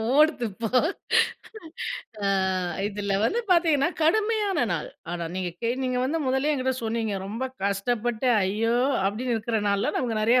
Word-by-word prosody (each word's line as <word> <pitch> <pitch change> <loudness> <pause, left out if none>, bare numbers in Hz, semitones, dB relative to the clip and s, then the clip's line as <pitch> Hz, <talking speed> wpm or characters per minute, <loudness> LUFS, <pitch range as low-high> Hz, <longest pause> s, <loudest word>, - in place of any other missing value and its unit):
ஓடுது 300 -5 +4
இப்போ. 225 +3 -4 1.6
ஆ 200 - +2 0.6
இதுல 200 -1 -3
வந்து 460 - +1
பார்த்தீங்கன்னா, 330 -4 +4
கடுமையான 420 +4 +2
நாள். - - -3 0.2
ஆனா 175 -1 -3
நீங்க 185 -1 -2
கே 230 - +1 0.3
வந்து 315 +5 0
முதல்லயே 265 +3 +2
என்கிட்ட 260 -1 0
சொன்னீங்க, 225 -2 -1
ரொம்ப 225 +6 -3 0.2
கஷ்டப்பட்டு 230 +4 0
அய்யோ! 220 +5 +1 0.3
அப்டின்னு 230 +5 0
இருக்குற 225 0 -1
நாள்ல 200 0 +1
நமக்கு 225 -4 -1
நெறைய 240 +3 +5
235 Hz, 135 wpm, -26 LUFS, 210-285 Hz, 1.6 s, நெறைய